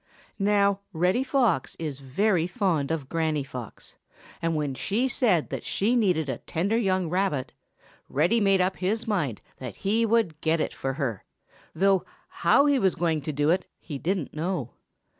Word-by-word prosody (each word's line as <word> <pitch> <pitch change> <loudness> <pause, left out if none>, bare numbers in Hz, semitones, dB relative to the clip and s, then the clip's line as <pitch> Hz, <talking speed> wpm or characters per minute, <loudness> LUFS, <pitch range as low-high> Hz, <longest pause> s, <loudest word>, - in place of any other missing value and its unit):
Now, 200 0 +3
Reddy 180 +9 +2
Fox 245 - +1
is 150 -4 -4
very 170 +6 +1
fond 180 - 0
of 155 -5 -2
Granny 155 -2 0
Fox, 125 -4 -9 0.4
and 165 -1 0
when 150 -3 -1
she 215 - 0
said 220 - +1
that - - -4
she 225 +5 +1
needed 180 -10 +2
a 130 -3 -3
tender 195 +7 -1
young 190 -6 +1
rabbit, 175 -6 -1 0.6
Reddy 170 - +2
made 195 -3 +3
up 185 +1 0
his 215 +5 -1
mind 150 - -1 0.2
that 125 -2 -7
he 220 +4 +3
would 220 -9 +1
get 160 +1 +2
it - - -1
for 135 0 -3
her, 130 - -3 0.5
though 195 -1 +3 0.3
how 280 - +3
he 285 -2 +3
was 190 -5 +2
going 165 -3 0
to 155 - -3
do 145 +2 +2
it 185 +2 0
he 145 -4 -7
didn't 180 -1 -2
know. 155 - -2
175 Hz, 170 wpm, -26 LUFS, 150-200 Hz, 0.6 s, Now